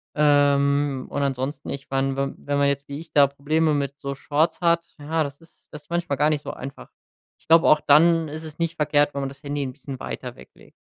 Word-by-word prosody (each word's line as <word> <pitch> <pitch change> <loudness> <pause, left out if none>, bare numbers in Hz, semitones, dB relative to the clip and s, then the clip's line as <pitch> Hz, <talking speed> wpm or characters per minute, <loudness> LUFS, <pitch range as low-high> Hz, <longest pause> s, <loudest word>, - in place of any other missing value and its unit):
Ähm, 145 -2 +2
und 145 - -3
ansonsten 135 +1 -3
ich 140 -1 -6
meine, 135 0 0
wenn 135 0 -2
wenn 145 0 0
man 140 0 +3
jetzt 140 0 -1
wie 140 +1 -6
ich 165 +1 -12
da 140 -1 +6
Probleme 150 +3 0
mit 140 -1 -2
so 140 0 -4
Shorts 150 +6 0
hat, 170 -1 +2
ja, 155 +2 -1
das 140 -1 -7
ist 165 - -23
das 150 0 -9
ist - - -30
manchmal 170 -4 -1
gar 150 +2 +3
nicht 150 -2 0
so - - -5
einfach. 135 +2 -9 0.5
Ich - - -28
glaube, 165 +1 +6
auch 155 -1 +5
dann 165 +3 +5
ist 155 +2 -7
es 155 -1 -10
nicht 165 0 -2
verkehrt, 145 -1 +2
wenn 140 - -3
man 135 - -2
das 140 +2 -14
Handy 145 0 -3
'n 130 - -4
bisschen 135 -1 -9
weiter 60 -2 -6
weglegt. - - -17
145 Hz, 240 wpm, -23 LUFS, 140-155 Hz, 0.5 s, da